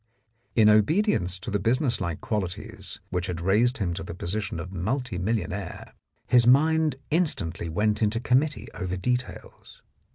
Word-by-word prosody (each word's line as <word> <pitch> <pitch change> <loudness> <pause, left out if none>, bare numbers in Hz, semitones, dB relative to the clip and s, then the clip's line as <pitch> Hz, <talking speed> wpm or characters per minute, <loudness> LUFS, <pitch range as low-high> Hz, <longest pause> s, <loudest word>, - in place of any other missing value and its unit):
In 110 -2 +6
obedience 105 - +3
to 95 - -6
the 100 - +1
business 115 +2 +1
like 85 -4 -3
qualities 95 -5 -4
which 90 0 -1
had 85 -2 -3
raised 110 +8 +2
him 95 -5 -1
to 95 - -5
the 85 -2 -7
position 90 0 -3
of 90 +3 -6
multi 110 +3 -2
millionaire 100 -2 -3 0.3
his 120 -1 +4
mind 155 +2 +4 0.2
instantly 115 - 0
went 105 +6 0
into 110 +1 +1
committee 135 +5 +1
over 95 -2 -3
details. 125 +7 -4
105 Hz, 150 wpm, -26 LUFS, 90-125 Hz, 0.3 s, In